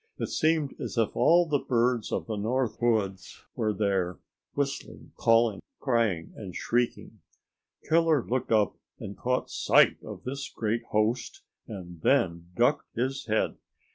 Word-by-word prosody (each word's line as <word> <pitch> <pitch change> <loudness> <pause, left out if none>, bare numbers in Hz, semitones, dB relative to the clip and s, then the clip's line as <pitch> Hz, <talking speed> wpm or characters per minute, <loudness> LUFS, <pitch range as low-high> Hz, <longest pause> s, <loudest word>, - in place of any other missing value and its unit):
It - - -3
seemed 155 -3 +1
as - - -5
if 115 -2 +1
all 175 +1 +5
the 150 -3 +1
birds 120 -2 +1
of - - -1
the 110 - -3
North 120 +4 -1
Woods 105 -5 -1
were 110 -2 0
there, 95 -3 0 0.4
whistling, 140 -1 -4
calling, 115 -2 +3 0.2
crying 115 - 0
and 95 -5 -8
shrieking. 120 0 -1 0.7
Killer 160 -4 +3
looked 130 0 -2
up 105 -3 +3 0.2
and 100 - -7
caught 125 +1 -1
sight - - +4
of - - -9
this 135 +2 -5
great 115 +1 -2
host, 110 +3 -1 0.2
and 90 -6 -9
then 85 - +2
ducked 125 +5 +1
his 130 +2 -2
head. 110 0 0
115 Hz, 140 wpm, -28 LUFS, 105-130 Hz, 0.7 s, all